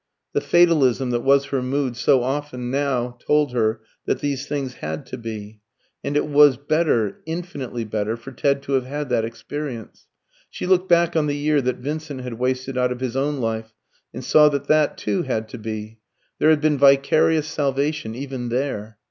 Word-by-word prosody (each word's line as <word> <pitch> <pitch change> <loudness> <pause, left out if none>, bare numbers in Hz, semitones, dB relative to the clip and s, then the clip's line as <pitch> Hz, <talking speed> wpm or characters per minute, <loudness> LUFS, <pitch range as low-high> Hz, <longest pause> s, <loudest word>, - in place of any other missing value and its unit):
The - - +1
fatalism 140 -8 +3
that 120 - +1
was 135 +2 +3
her 135 -2 -2
mood 130 -1 -1
so 130 +1 +3
often 130 -2 -3
now 125 -3 -1
told 150 -2 +2
her 110 -2 +1 0.3
that - - +1
these 140 -2 -2
things 140 -3 -3
had 80 0 -4
to - - -7
be. 110 -2 -7 0.4
And 145 - -1
it - - +1
was 145 -3 +5
better, 145 - 0
infinitely 160 -8 -4
better, 110 +1 -2
for 125 +3 -10
Ted 140 +2 0
to - - -6
have 130 -2 +1
had 145 0 -4
that 110 - +1
experience. 120 +1 -7 0.4
She - - -6
looked 185 0 +2
back 170 0 +4
on 155 -2 +2
the 145 0 -1
year 150 0 +2
that 125 -1 -1
Vincent 145 +1 -5
had 125 -2 -7
wasted 130 +1 -1
out 125 0 +2
of 125 - -4
his 130 -1 -3
own 145 +2 0
life, 110 -1 -3 0.4
and 130 - -7
saw 150 +3 +6
that 140 -1 -2
that 155 -1 +3
too 105 -2 -1
had 110 0 -2
to 125 - -8
be. 110 0 -6 0.4
There 155 - +4
had 155 -2 +4
been 150 -2 +2
vicarious 140 +3 +4
salvation 145 -4 -1
even 130 -2 -5
there. 115 -4 -3
135 Hz, 190 wpm, -22 LUFS, 120-145 Hz, 0.4 s, saw